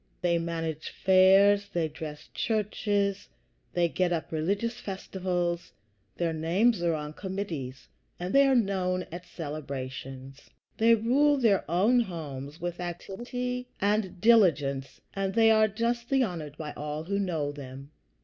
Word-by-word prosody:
They 170 -1 +2
manage 165 -2 -3
fairs, 195 +2 +5
they 170 -2 +1
dress 150 -1 -8
churches, 205 -2 -1 0.4
they 175 -1 +3
get 180 +1 0
up 165 -2 -2
religious 200 +9 -1
festivals, 180 -3 -3 0.4
their 170 -2 0
names 175 +7 +2
are 170 -2 +1
on 150 0 -5
committees, 165 -9 -5 0.3
they 275 +11 +3
are 270 - +4
known 185 -5 +1
at 175 +1 -8
celebrations. 135 -4 -7 0.3
They 230 +1 +6
rule 275 +6 +3
their 220 -7 +3
own 205 +9 +4
homes 150 - -5
with 175 0 -4
activity 240 +8 -4
and 200 -2 0
diligence, 165 - +3
and 195 -1 -2
they 225 -1 +6
are 220 0 +5
justly 235 +5 0
honored 160 -8 -5
by 150 -2 -6
all 150 +1 -4
who 200 +4 -1
know 160 -7 -1
them. 140 0 -10
180 Hz, 130 wpm, -28 LUFS, 155-210 Hz, 0.4 s, They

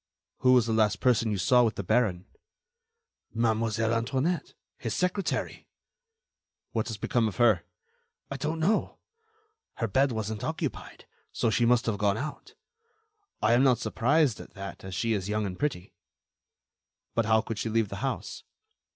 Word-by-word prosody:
"Who 130 -1 +5
was 125 -3 +5
the 115 - -1
last 110 -1 +2
person 115 -3 +2
you 105 - -1
saw 125 +7 +4
with 115 -2 +1
the 100 - -4
baron?" 100 -3 +1 1.1
"Mademoiselle 115 0 +1
Antoinette, 135 +9 -1 0.2
his 115 - -3
secretary." 180 0 -2 1.0
"What 110 -2 -1
has 110 -2 -4
become 115 +2 +1
of 105 - -5
her?" 110 -7 +3 0.7
"I 140 - -3
don't 155 +4 -2
know. 200 +7 +1 0.8
Her 115 - -1
bed 135 +7 +2
wasn't 110 -1 -4
occupied, - - -4 0.3
so 115 - 0
she 120 +1 +2
must 120 0 +3
have 105 -3 -1
gone 100 -1 +2
out. 145 +5 -6 0.9
I 110 +2 +4
am 120 - +5
not 130 -3 +4
surprised 140 -1 +1
at - - -12
that, 100 0 -8
as 95 -1 -6
she 115 +5 0
is 100 -2 -2
young 105 0 0
and 90 -2 -5
pretty." 140 -12 -3 1.2
"But 115 - +1
how 110 0 +4
could 110 -1 -5
she 115 - -2
leave 110 -2 +1
the 100 - -6
house?" 135 +5 -4
115 Hz, 160 wpm, -28 LUFS, 105-125 Hz, 1.2 s, Who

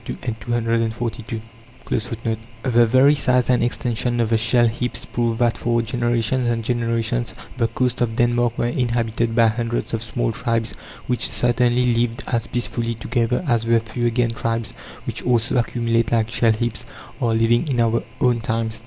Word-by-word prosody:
(6) - - -4 0.3
The 115 -1 -1 1.4
very 130 +5 +5
size 125 -3 +2
and 125 -2 +3
extension 120 0 -1
of 115 -1 +1
the 115 - +4
shell 120 +1 +3
heaps 125 +2 -3
prove 115 -1 -1
that 120 -4 +1
for 120 0 +1
generations 120 +1 0
and 115 -1 -1
generations 115 0 -1 0.2
the 120 -3 +1
coasts 125 +1 -1
of 115 -2 0
Denmark 120 0 +1
were - - 0
inhabited 115 -2 0
by 115 -1 +5
hundreds 115 +1 -1
of 115 - -1
small 115 +1 -1
tribes 115 -2 -1 0.3
which 125 -1 0
certainly 120 0 +2
lived 115 0 0
as 115 -2 -1
peacefully 120 -1 -2
together 120 +5 -1
as 115 -3 +2
the 115 0 +4
Fuegian 120 +1 -1
tribes, 115 -1 -2 0.3
which - - -4
also 120 0 +1
accumulate 115 -1 0
like 115 -1 +1
shellheaps, 115 0 +1 0.4
are 115 -1 +2
living 115 +6 +2
in 130 -4 0
our 115 0 +2 0.2
own 125 -2 +3
times. 115 -1 -2
115 Hz, 155 wpm, -21 LUFS, 115-120 Hz, 1.4 s, very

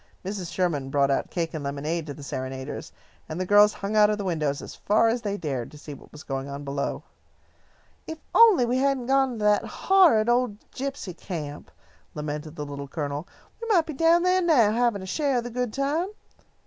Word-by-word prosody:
Mrs. 190 -3 -4
Sherman 155 -8 -1
brought 140 0 +2
out 135 - 0
cake 170 -2 -3
and 155 -3 -4
lemonade 150 +4 -3
to 145 - -5
the 145 - -11
serenaders, 130 -1 -5 0.4
and 155 +2 -4
the 185 - -1
girls 205 +2 +6
hung 205 +1 -4
out 210 -1 +6
of 210 - 0
the 205 - -4
windows 155 -6 -1
as - - -8
far 215 +2 +2
as 235 +1 -1
they 205 -2 -2
dared, 135 - -3
to 150 - -13
see 150 0 -9
what 140 - -14
was 150 +1 -11
going 135 0 -4
on 140 +1 -6
below. 140 0 -3 1.0
"If 320 - -5
we - - -36 0.2
only 255 - +6
hadn't 270 -2 +1
gone 270 0 +2
to 215 - -4
that 210 0 +4
horrid 345 - +4
old 240 -3 +1
gypsy 270 -9 -5
camp," 155 -6 -7 0.5
lamented 150 +1 -5
the 150 - -5
Little 140 0 -7
Colonel, 145 +2 -4 0.3
"we 460 - -5
might 365 -8 +3
be 310 - -6
down 330 +4 +4
there 365 +1 +3
now, 275 - +4
having 230 -3 +1
a - - -6
share 275 +6 0
of 240 - -1
the 240 - -6
good 250 -1 -2
time. 285 - 0
200 Hz, 210 wpm, -25 LUFS, -, 1.0 s, girls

